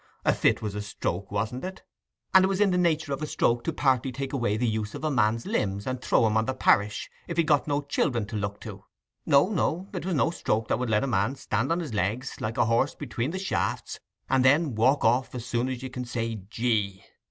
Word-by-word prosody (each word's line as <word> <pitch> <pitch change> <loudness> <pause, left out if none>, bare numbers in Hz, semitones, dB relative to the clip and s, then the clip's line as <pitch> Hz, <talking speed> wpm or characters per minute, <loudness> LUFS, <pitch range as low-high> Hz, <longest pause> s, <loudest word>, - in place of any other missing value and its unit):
A - - +4
fit - - +2
was 105 -2 -3
a 105 - -3
stroke, 100 -2 -4
wasn't 110 +5 -2
it? 185 +1 -6 0.5
and 190 - +8
it - - +4
was 195 0 -1
in 205 -2 +4
the 180 - +2
nature 160 -4 +1
of 135 - -4
a 155 - -2
stroke 120 -4 +1
to - - 0
partly 130 -4 +1
take 135 +2 -5
away 120 -6 0
the 120 - 0
use 110 -1 -2
of - - -7
a 155 - +1
man's 115 -2 +1
limbs 100 0 -1
and 130 -1 -3
throw 115 - +3
him 110 -1 +1
on 110 - +2
the 130 - -2
parish, 105 -4 +2 0.2
if 170 - -5
he'd 170 - +4
got 150 -2 +2
no 145 0 +1
children 130 -5 0
to 105 - -7
look 100 -1 -3
to. - - -9 0.4
No, 140 +6 +5
no; 185 -1 -1
it 180 - -4
was 185 -1 -1
no 150 - +2
stroke 110 -9 -1
that 110 - +1
would 125 -2 -2
let 105 +2 +2
a - - 0
man 105 +2 +1
stand 135 0 -1
on 170 - +1
his 150 -9 -6
legs, 105 +7 -2
like 110 +1 -3
a - - +4
horse 115 +5 +1
between 120 -2 -3
the 185 - -4
shafts, 190 0 -2 0.3
and 130 -1 +3
then 145 +2 +4
walk 130 +6 +3
off 125 +3 +2
as 120 -1 -5
soon 125 0 -1
as 130 -1 -5
you 130 - -4
can 125 -1 -5
say 115 -1 -2 0.2
"Gee!" 105 -5 -1
125 Hz, 250 wpm, -27 LUFS, 110-145 Hz, 0.5 s, and